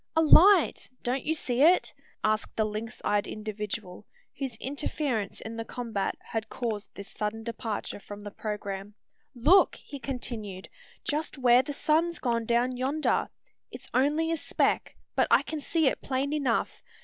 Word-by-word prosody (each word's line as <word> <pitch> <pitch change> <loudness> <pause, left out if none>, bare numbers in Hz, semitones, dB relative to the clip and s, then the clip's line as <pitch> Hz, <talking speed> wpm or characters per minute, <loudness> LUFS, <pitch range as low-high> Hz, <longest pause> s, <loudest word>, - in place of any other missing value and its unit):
"A 320 - +5
light! 360 +3 +6
Don't 255 +2 -1
you 320 - +1
see 255 -4 0
it?" 345 +5 +5 0.3
asked 215 0 0
the 220 - +2
lynx 215 +2 -5
eyed 205 0 +1
individual, 210 -2 -5 0.3
whose 265 -4 -3
interference 265 -3 -2
in 225 +1 -6
the 225 - -2
combat 225 -4 -3
had 225 -1 -4
caused 220 -4 -4
this 200 - -8
sudden 215 +1 -4
departure 225 -3 -4
from 205 0 -10
the 205 - -6
programme. 205 -1 -5 0.4
"Look!" 320 +11 +5
he 280 - -9
continued; 230 -7 -5 0.4
"just 300 +1 -2
where 250 -1 +6
the 285 +3 -5
sun's 325 +4 +1
gone 235 -2 0
down 245 +2 +2
yonder. 275 +5 +1 0.4
It's - - -11
only 300 +5 +2
a 330 - +1
speck; - - 0 0.2
but - - +3
I - - +5
can 315 - -4
see 320 +2 +1
it 265 - +1
plain 270 +2 -1
enough. 275 -6 0
240 Hz, 160 wpm, -28 LUFS, 215-290 Hz, 0.4 s, light